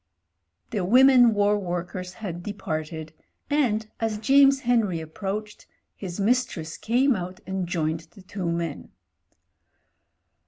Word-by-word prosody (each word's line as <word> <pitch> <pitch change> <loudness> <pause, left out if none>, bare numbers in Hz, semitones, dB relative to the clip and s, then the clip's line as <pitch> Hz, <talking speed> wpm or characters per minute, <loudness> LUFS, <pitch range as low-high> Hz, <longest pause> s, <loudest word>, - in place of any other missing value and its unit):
The 210 -5 -1
Women 250 +3 +6
War 205 0 +3
Workers 180 0 -4
had 180 -4 -6
departed, 160 -5 -5 0.4
and, 235 -7 +1
as 225 -2 -1
James 275 +4 +5
Henry 225 -8 +1
approached, 200 +6 -6 0.3
his 185 -1 -7
mistress 200 -8 0
came 255 +3 +2
out 185 0 -6
and 190 -1 -3
joined 160 -1 -2
the 195 - -14
two 185 -3 -3
men. 170 -3 -4
195 Hz, 115 wpm, -25 LUFS, 175-225 Hz, 0.4 s, Women